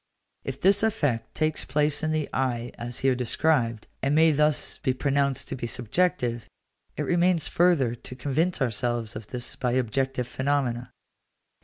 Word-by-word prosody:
If 135 0 -5
this 195 +2 +4
effect 145 - 0
takes 155 -1 0
place 145 +2 +1
in 155 - 0
the 155 -2 0
eye 125 -2 -1
as 120 0 -5
here 135 - +5
described, 125 -2 +1 0.2
and 140 +2 +1
may 160 +1 +6
thus 150 0 +1
be 130 -4 0
pronounced 140 0 0
to - - -3
be 120 -2 -4
subjective, 120 0 -1 0.5
it - - -1
remains 175 -2 +2
further 165 -9 +3
to 120 +1 -9
convince 145 +5 0
ourselves 120 -1 -1
of 110 -1 -7
this 125 -1 -2
by 125 -1 -1
objective 130 +1 0
phenomena. 130 -3 -1
135 Hz, 155 wpm, -26 LUFS, 120-155 Hz, 0.5 s, may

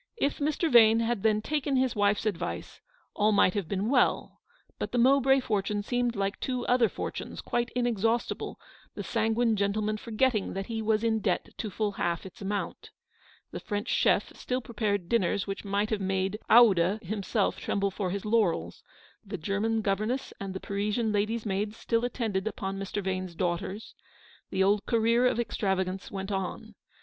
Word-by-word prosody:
If 290 -9 0
Mr. 305 +3 0
Vane 225 -1 +7
had 230 -2 0
then 215 0 +2
taken 290 -1 -1
his 255 -1 +1
wife's 205 +1 +2
advice, 205 -6 -3 0.3
all 210 +1 +2
might 200 -3 +4
have 200 -5 -2
been 200 +2 -1
well; 250 0 +1 0.4
but - - -3
the - - -1
Mowbray 270 +2 +5
for 210 -5 0
tune 205 +1 -2
seemed 245 +1 0
like 195 0 -2
the - - -3
two 250 -2 -2
other 245 -3 +3
fortunes, - - -5
quite 240 0 -1
in 245 -1 +1
exhaustible, 230 0 -1 0.4
the - - -4
sanguine 225 0 +1
gentleman 210 +1 0
forgetting 230 0 0
that 195 0 -3
he 225 0 -3
was 215 0 +1
in 225 -1 +2
debt 190 -3 -1
to 215 - -3
full 210 +1 -1
half 170 -3 -2
its 190 - -11
amount. 200 +1 -4 0.6
The - - -5
French 205 -1 -4
chef - - +2
still 250 0 -2
prepared 210 -6 -2
dinners 200 -3 +1
which 195 -1 -5
might 205 +1 -1
have 215 -2 0
made 190 +2 -1
Oude 200 -5 +6
himself 200 +2 -1
tremble 200 0 -1
for 190 -1 -2
his 200 +2 -4
laurels; 210 -6 +1 0.4
the 200 -1 -6
German 210 +6 -1
governess 215 +7 -1
and 195 -1 -5
the - - -3
Parisian 210 +3 -1
lady's 215 +2 0
maids 205 +2 -2
still 230 0 0
attended 220 -5 -1
upon 195 -2 -4
Mr. 195 +1 -3
Vane's 185 -2 -3
daughters; 180 +4 -3 0.6
the 190 0 +1
old 200 +1 +2
career 230 +1 +3
of 250 -2 0
extravagance 190 -4 -1
went 195 0 -5
on. 195 +3 -4
210 Hz, 175 wpm, -28 LUFS, 195-230 Hz, 0.6 s, Vane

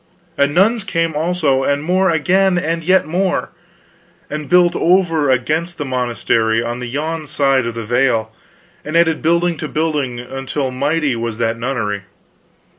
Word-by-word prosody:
And 140 -1 +1
nuns 215 +4 +3
came, 165 -3 -1
also; 155 -4 +1
and 145 +1 0
more 185 +3 +2
again, 180 +4 +2
and 165 0 -1
yet 185 +3 +3
more; 180 +4 -1 0.8
and 150 -1 -5
built 180 -1 +4
over 165 -5 +2
against 155 +7 0
the 145 - -4
monastery 120 -3 0
on 120 +1 -4
the 125 - -5
yon 155 +4 -3
side 135 -4 +1
of 115 - -5
the 115 -1 -5
vale, 115 -2 +1 0.5
and 155 +3 -1
added 165 -2 +2
building 170 +1 +1
to 155 - -4
building, 150 -6 -2
until 135 +2 -4
mighty 145 +1 0
was 115 -1 -4
that 115 0 0
nunnery. 115 -5 -2
150 Hz, 155 wpm, -17 LUFS, 125-170 Hz, 0.8 s, built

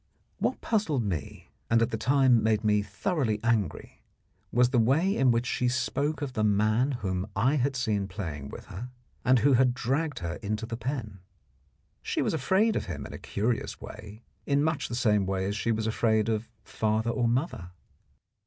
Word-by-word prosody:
What - - -1
puzzled 170 - 0
me, 85 -8 -5 0.2
and 115 - +4
at 115 - +1
the - - -1
time 130 0 +4
made 110 0 +1
me 105 -1 +3
thoroughly 110 - -1
angry, 110 -7 -1 0.5
was 125 +1 +3
the 125 - +3
way 155 - +3
in 135 -1 +3
which 120 0 +2
she 125 0 0
spoke 140 +4 -1
of 135 -3 -4
the 110 - 0
man 110 +6 +2
whom 95 0 -1
I 130 +9 +2
had 135 +1 0
seen 105 -6 0
playing 85 -8 -6
with - - -9
her, 120 +7 -7 0.3
and 130 +1 +5
who 140 +4 +4
had 125 0 +4
dragged 140 +6 -1
her 85 -1 -4
into 110 0 -3
the 115 0 -4
pen. 115 -5 -4 0.8
She - - -1
was - - 0
afraid 190 - +2
of - - -1
him 75 -6 -5
in - - -8
a - - -7
curious 115 +3 -2
way 105 +3 -10 0.2
in 140 0 +2
much 160 -1 0
the 120 - -4
same 105 -5 +2
way 95 -1 -1
as 100 +1 -2
she 115 - 0
was 110 -1 -1
afraid 110 -1 +1
of 110 0 -2
father 110 +1 0
or 120 -1 +1
mother. 120 - -1
115 Hz, 190 wpm, -28 LUFS, 105-130 Hz, 0.8 s, and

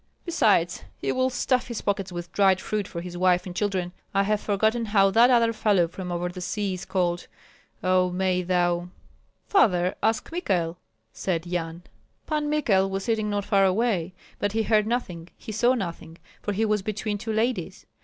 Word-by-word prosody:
Besides, 210 - +2
he - - -2
will 255 0 +1
stuff 250 0 0
his 235 -3 -4
pockets 195 -2 -1
with 175 0 -6
dried 190 -2 +4
fruit 210 -1 -2
for 170 - -6
his 175 0 -7
wife 180 0 +2
and 180 -2 -7
children. 190 -4 -1 0.2
I 195 - +4
have 210 +1 0
forgotten 220 +3 +1
how 195 -2 +4
that 235 +4 +6
other 230 -2 +4
fellow 205 -6 +2
from 180 +1 -7
over 175 0 -1
the 180 +1 -8
sea 200 +2 -2
is 180 - -6
called. 175 -2 -1 0.6
Oh, 185 0 +3
may 180 0 0
thou 175 -1 0 0.3
" - - -41
"Father, 180 - +3
ask 220 +6 0
Michael," 180 - -1 0.3
said 175 -3 -2
Yan. 170 -1 -4 0.4
Pan 300 -1 -1
Michael 200 -11 +2
was 195 0 -3
sitting 220 -2 0
not 205 -1 -1
far 200 -2 +3
away; 190 -3 +1 0.2
but 205 0 -1
he 225 0 +1
heard 215 -1 +2
nothing, 180 -9 -3
he 225 - -8
saw 240 +4 +3
nothing, 170 -6 -5 0.2
for 205 - -2
he 210 +3 +1
was 210 -1 +1
between 210 +1 -3
two 220 +2 -4
ladies. 220 -5 -1
195 Hz, 185 wpm, -25 LUFS, 180-220 Hz, 0.6 s, that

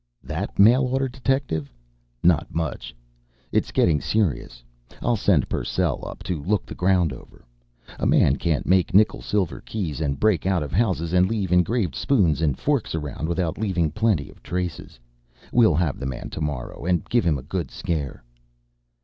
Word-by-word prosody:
"That - - -5
mail 115 +7 +6
order 135 +1 0
detective? 130 - -2 0.5
Not 85 -2 +3
much! 80 -6 -3 0.6
It - - +2
is - - -12
getting 75 -4 +2
serious. 80 - -1 0.4
I'll 120 - +1
send 95 - +2
Purcell - - -1
up - - -9
to 85 -5 -3
look 100 +5 0
the - - -8
ground 90 -3 +2
over. - - -14 0.5
A - - +1
man 70 - +4
can't 80 -4 -1
make 95 -1 +2
nickel 105 +2 +4
silver 100 -5 -1
keys, 85 -9 -4
and 70 -3 -1
break 105 -4 +2
out 95 -4 +1
of 70 - -6
houses 90 -5 0
and 90 0 +4
leave 105 -5 -2
engraved 90 - +2
spoons 85 - +2
and 75 -5 +1
forks 140 - 0
around 75 +1 -4
without 85 -1 -1
leaving 90 -7 0
plenty 105 -6 +1
of - - -21
traces. 90 -7 -5 0.5
We'll 115 -9 +5
have 80 -3 0
the 65 - -3
man 65 -2 -6
to - - -6
morrow, 75 -5 -4
and 90 -2 0
give 120 0 +2
him 80 -4 +2
a 65 - -8
good 80 -1 -3
scare." 75 -8 -4
90 Hz, 175 wpm, -24 LUFS, 75-105 Hz, 0.6 s, mail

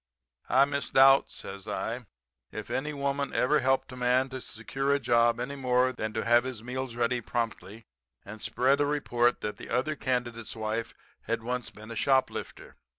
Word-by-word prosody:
"'I 135 +2 +6
misdoubt,' 135 -1 +4
says 100 +1 -8
I, 115 +2 -3 0.4
'if - - -7
any 150 +3 -1
woman 140 -1 -2
ever 145 +4 +3
helped 130 0 +1
a - - -8
man 125 +1 +2
to 130 0 -6
secure 135 +6 -3
a - - 0
job 120 -2 +3
any 130 +3 -3
more 130 -1 +2
than 110 -3 -3
to - - -2
have 120 +1 +5
his 125 -4 -6
meals 125 0 -4
ready 120 +1 0
promptly 115 -2 -4 0.4
and 110 +2 -9
spread 135 +3 +2
a 145 - +2
report 120 -5 +1
that 105 - -4
the - - -10
other 130 +6 0
candidate's 120 -4 -2
wife 110 +1 -3 0.3
had - - -2
once 125 0 -3
been 110 +2 -12
a - - -5
shoplifter. 130 +3 -1
125 Hz, 175 wpm, -29 LUFS, 115-135 Hz, 0.4 s, I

